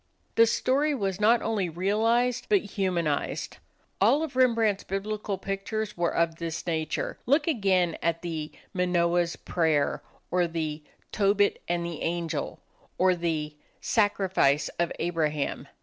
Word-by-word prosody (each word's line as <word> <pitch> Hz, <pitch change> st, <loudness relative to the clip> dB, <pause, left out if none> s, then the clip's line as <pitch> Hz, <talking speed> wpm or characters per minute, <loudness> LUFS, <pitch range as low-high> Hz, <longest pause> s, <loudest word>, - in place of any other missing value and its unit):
The 230 Hz, 0 st, +6 dB
story 280 Hz, +6 st, +1 dB
was 195 Hz, -4 st, -2 dB
not 230 Hz, +2 st, +4 dB
only 205 Hz, -5 st, 0 dB
realized, 225 Hz, +8 st, +1 dB
but 405 Hz, -3 st, +4 dB
humanized. 175 Hz, -7 st, -1 dB, 0.4 s
All 255 Hz, +10 st, +4 dB
of 300 Hz, -5 st, -5 dB
Rembrandt's 230 Hz, -5 st, +3 dB
Biblical 200 Hz, +1 st, -3 dB
pictures 205 Hz, +3 st, -3 dB
were 170 Hz, -1 st, +1 dB
of 165 Hz, -1 st, 0 dB
this 165 Hz, -1 st, -4 dB
nature. 160 Hz, -2 st, -2 dB
Look 290 Hz, +4 st, +3 dB
again 190 Hz, -, +2 dB
at 165 Hz, 0 st, -1 dB
the 160 Hz, -3 st, -4 dB, 0.2 s
"Manoah's 175 Hz, -2 st, +1 dB
Prayer," 160 Hz, -4 st, 0 dB, 0.3 s
or 180 Hz, 0 st, +2 dB
the 160 Hz, -2 st, -3 dB, 0.3 s
"Tobit 205 Hz, 0 st, +2 dB
and 175 Hz, 0 st, -1 dB
the 170 Hz, -2 st, -5 dB
Angel," 165 Hz, -3 st, -2 dB, 0.4 s
or 185 Hz, 0 st, +4 dB
the 160 Hz, -3 st, -2 dB, 0.2 s
"Sacrifice 190 Hz, -, +2 dB
of 170 Hz, -1 st, +1 dB
Abraham." 155 Hz, -4 st, -1 dB
180 Hz, 130 wpm, -27 LUFS, 165-215 Hz, 0.4 s, The